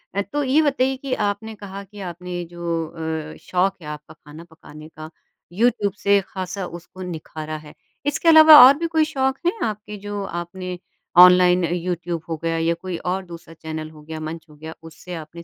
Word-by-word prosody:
अ, 200 - +1
तो 290 +8 -3
ये 275 +4 +3
बताइए 270 -3 +1
कि 270 0 -4
आपने 215 +2 -3
कहा 200 -1 -8
कि 205 +1 -14
आपने 175 +1 -6
जो 175 - -11 0.7
अ, - - -14
शौक 185 +1 0
है 150 - -10
आपका 150 0 -8
खाना 155 +2 -13
पकाने 155 -2 -14
का 155 0 -10 0.5
यूट्यूब 215 -5 +2
से 200 0 +5
ख़ासा 185 0 -5
उसको 175 +2 -11
निखारा 155 -1 -6
है, 150 - -13 0.3
इसके 290 +3 -1
अलावा 315 -1 +10
और 275 +2 +7
भी 335 +1 -2
कोई 310 - +5
शौक 265 0 0
हैं 350 - +3
आपके 210 -1 -5
जो 205 -1 -4 0.2
आपने 180 +1 -7 0.5
ऑनलाइन 180 0 +6
यूट्यूब 175 -1 -3
हो 160 - -2
गया 165 0 0
या 165 +1 +1
कोई 185 -2 -4
और 185 +2 -3
दूसरा 170 -1 -11
चैनल 155 -1 -7
हो 155 -1 -15
गया, 160 +1 -7
मंच 160 +1 -6
हो 150 - -16
गया 160 +2 -9
उससे 165 +2 -11
आपने 165 +1 -9
180 Hz, 190 wpm, -22 LUFS, 165-210 Hz, 0.7 s, अलावा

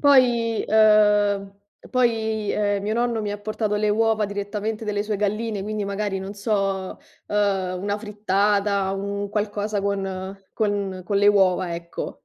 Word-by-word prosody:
Poi, 240 -5 +4
uhm, 210 -2 +4 0.3
e - - -15
poi, 220 -4 +1
uhm, 205 -1 0
mio 215 +1 -1
nonno 235 -1 0
mi 210 - -3
ha 205 - -4
portato 215 0 -2
le 210 0 +1
uova 220 0 +2
direttamente 205 +2 -4
delle 205 -1 0
sue 210 0 -2
galline, 210 0 -1
quindi 210 0 -3
magari, 200 0 -2
non 190 +1 -6
so, 195 -2 -1 0.3
uhm, 195 -3 0
una 205 +1 -1
frittata, 205 -1 +1
un 200 +1 -3
qualcosa 210 0 -2
con 195 -1 -3 0.2
con 200 -3 -1
con 200 - -1
le 205 - +4
uova, 185 -3 +3
ecco. 170 0 -6
205 Hz, 150 wpm, -23 LUFS, 200-215 Hz, 0.3 s, Poi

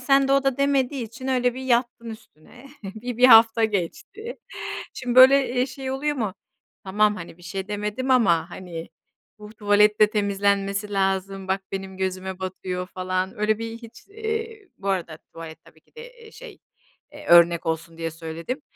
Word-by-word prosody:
sen 275 +1 +3
de - - +3
o 275 0 +3
da 270 -2 +1
demediği 275 -2 0
için 235 +4 -8
öyle 250 -2 +1
bir 260 - -7
yattın 240 -2 0
üstüne, 220 - -14 0.2
bir 220 +5 -6
1 250 - +3
hafta 225 -1 +7
geçti. 220 - -4 0.6
Şimdi, 250 -2 -3
böyle, 265 +2 +7
eee, 250 0 +1
şey 265 +1 -6
oluyor 290 +3 -2
mu? 215 -7 -2 0.5
Tamam, 210 +2 +2
hani, 170 -1 -10
bir - - -18
şey 190 +3 -6
demedim 210 +5 -3
ama, 175 -10 +3
hani, 170 -2 -8 0.5
bu 210 +1 -12
tuvalet 210 0 +3
de 210 -1 +6
temizlenmesi 200 0 0
lazım, 195 0 -1
bak 195 +1 0
benim 190 -1 -5
gözüme 190 0 -4
batıyor 185 -1 -5
falan, 185 +1 -3
öyle 215 0 +1
bir 230 0 -6
hiç, 230 -1 -14
iii, 445 -1 -5
bu 200 - -5
arada 170 -5 -2 0.2
tuvalet 165 -1 -10
tabii - - -21
ki - - -36
de, 465 - -8 0.2
eee, 450 -1 -14
şey, - - -12 0.5
eee, - - -12
örnek 170 -1 +6
olsun 165 0 -3
diye 165 0 -3
söyledim. 165 - -6
210 Hz, 175 wpm, -24 LUFS, 190-255 Hz, 0.6 s, hafta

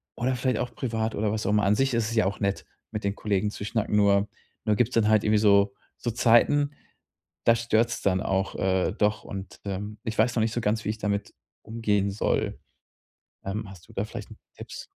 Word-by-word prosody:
oder 130 +2 0
vielleicht 125 -2 0
auch 125 0 -3
privat 110 -3 -2
oder 105 0 0
was 110 0 -2
auch - - +2
immer. 105 0 +3
An 100 +1 +4
sich 135 +3 +1
ist 115 -1 +1
es - - -3
ja 110 - +3
auch 100 - -3
nett, 100 -1 -1 0.3
mit 105 -1 -4
den 100 0 -1
Kollegen 105 -1 0
zu 100 - -7
schnacken. 110 -1 -1
Nur 100 0 +4 0.4
nur 105 -2 +3
gibt's 120 +3 +1
dann 115 -2 +3
halt 110 -1 +4
irgendwie 105 0 +3
so 100 -1 +4 0.2
so 120 - -2
Zeiten, 120 +5 +4 0.8
da 115 - +7
stört's 115 0 +1
dann 95 -1 +2
auch, 95 0 -1
äh, 95 0 +1
doch 105 0 +1
und, 95 -1 -8
ähm, 100 +2 -4
ich 110 -2 -3
weiß 115 +2 +3
noch - - +3
nicht 110 0 0
so 120 - 0
ganz, 110 +1 0
wie - - +1
ich 110 - -3
damit 100 -1 -2 0.3
umgehen 105 -3 0
soll. 100 - -1 0.9
Ähm, 105 +3 -3
hast 90 -3 -14
du - - -15
da 100 - -1
vielleicht 110 - -8
'n - - -11 0.2
Tipps? - - -8
105 Hz, 220 wpm, -26 LUFS, 100-115 Hz, 0.9 s, da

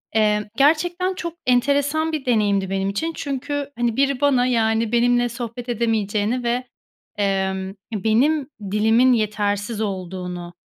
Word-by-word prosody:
Eee, 210 -1 +2
gerçekten 345 +6 +2
çok 340 -3 -5
enteresan 285 +5 +2
bir 305 -4 -4
deneyimdi 205 -5 +1
benim 195 0 -1
için. 320 +12 -2
Çünkü, 285 0 -3
hani, 240 -2 0
biri 275 -1 +1
bana, 265 -4 +3
yani, 225 -2 +1
benimle 245 0 +3
sohbet 240 +1 -6
edemeyeceğini 225 0 0
ve, 240 +2 0 0.6
emm, 190 -1 -1 0.2
benim 250 +8 +2 0.2
dilimin 225 +5 +4
yetersiz 210 0 -1
olduğunu, 180 -3 -5
235 Hz, 125 wpm, -22 LUFS, 205-275 Hz, 0.6 s, dilimin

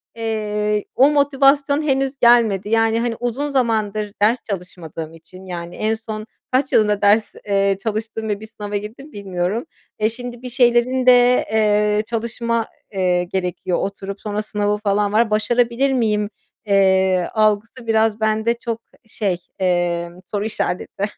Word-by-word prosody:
eee, 210 -2 -1
o 270 +3 +6
motivasyon 280 0 +3
henüz 270 -2 0
gelmedi. 225 -5 +4
Yani, 225 0 +2
hani, 235 -1 -1
uzun 250 +5 -2
zamandır 215 -5 0
ders 225 +4 +4
çalışmadığım 165 -4 -6
için, 185 +3 -14
yani 175 -1 -6
en 215 +1 0
son 220 -1 -6 0.3
kaç 260 +2 +1
yılında 210 -2 +3
ders, 210 +2 +3
eee, 195 -1 +2
çalıştım 220 0 -3
ve 205 - -1
bir 220 - -9
sınava 210 -1 -7
girdim 220 +9 -6
bilmiyorum. 195 +2 -3 0.4
Eee, 215 +1 +2
şimdi 245 +1 -5
bir 250 - -6
şeylerin 245 +1 +3
de, 250 0 +5
eee, 210 -1 +2
çalışma, 230 0 -2 0.3
eee, 180 -2 +1
gerekiyor 180 0 -2
oturup 200 0 -5
sonra 210 0 -2
sınavı 210 -1 -1
falan 205 0 +1
var. 220 +1 +3
Başarabilir 240 +5 +1
miyim, 210 -4 +1 0.4
eee, 190 -2 +3
algısı 215 +3 0
biraz 220 -1 +2
bende 220 +1 +1
çok 230 -1 -5 0.2
şey, 200 -5 -2 0.2
emm, 175 -1 0
soru 205 +2 -3
işareti. 200 -2 -2
215 Hz, 140 wpm, -20 LUFS, 200-235 Hz, 0.4 s, o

